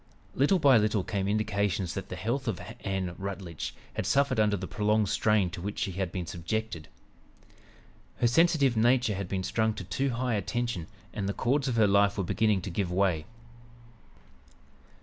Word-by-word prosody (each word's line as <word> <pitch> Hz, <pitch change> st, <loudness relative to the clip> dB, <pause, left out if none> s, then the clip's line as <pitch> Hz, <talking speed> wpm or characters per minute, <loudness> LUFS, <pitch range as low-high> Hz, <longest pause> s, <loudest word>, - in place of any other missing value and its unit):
Little 145 Hz, +8 st, +3 dB
by 140 Hz, -7 st, +6 dB
little 105 Hz, -2 st, +1 dB
came 100 Hz, -1 st, -2 dB
indications 100 Hz, -3 st, 0 dB
that -, -, -6 dB
the -, -, -5 dB
health 125 Hz, +6 st, -2 dB
of 110 Hz, -6 st, -1 dB, 0.2 s
Ann 95 Hz, -2 st, -2 dB
Rutledge 95 Hz, -4 st, -5 dB, 0.2 s
had -, -, -3 dB
suffered 140 Hz, -3 st, +2 dB
under 105 Hz, -1 st, +3 dB
the 95 Hz, -, -5 dB
prolonged 105 Hz, +1 st, +1 dB
strain 105 Hz, -5 st, +2 dB
to 90 Hz, -, -7 dB
which 100 Hz, +3 st, -4 dB
she 100 Hz, -, -1 dB
had 95 Hz, -1 st, -3 dB
been 90 Hz, -2 st, -4 dB
subjected. 85 Hz, +1 st, -4 dB, 1.3 s
Her -, -, 0 dB
sensitive 140 Hz, 0 st, +4 dB
nature 120 Hz, 0 st, +3 dB
had 100 Hz, -1 st, -4 dB
been 95 Hz, -1 st, -2 dB
strung 110 Hz, +2 st, 0 dB
to -, -, -6 dB
too 95 Hz, +10 st, -1 dB
high 125 Hz, 0 st, -1 dB
a 105 Hz, -, 0 dB
tension 120 Hz, -5 st, -3 dB, 0.3 s
and 100 Hz, -2 st, -2 dB
the -, -, -1 dB
chords 135 Hz, +6 st, 0 dB
of 125 Hz, -, 0 dB
her 110 Hz, -2 st, +5 dB
life 100 Hz, 0 st, +3 dB
were 100 Hz, -, 0 dB
beginning 105 Hz, +1 st, +1 dB
to 95 Hz, -, -5 dB
give 90 Hz, 0 st, -2 dB
way. 90 Hz, -4 st, +1 dB
105 Hz, 180 wpm, -29 LUFS, 95-115 Hz, 1.3 s, by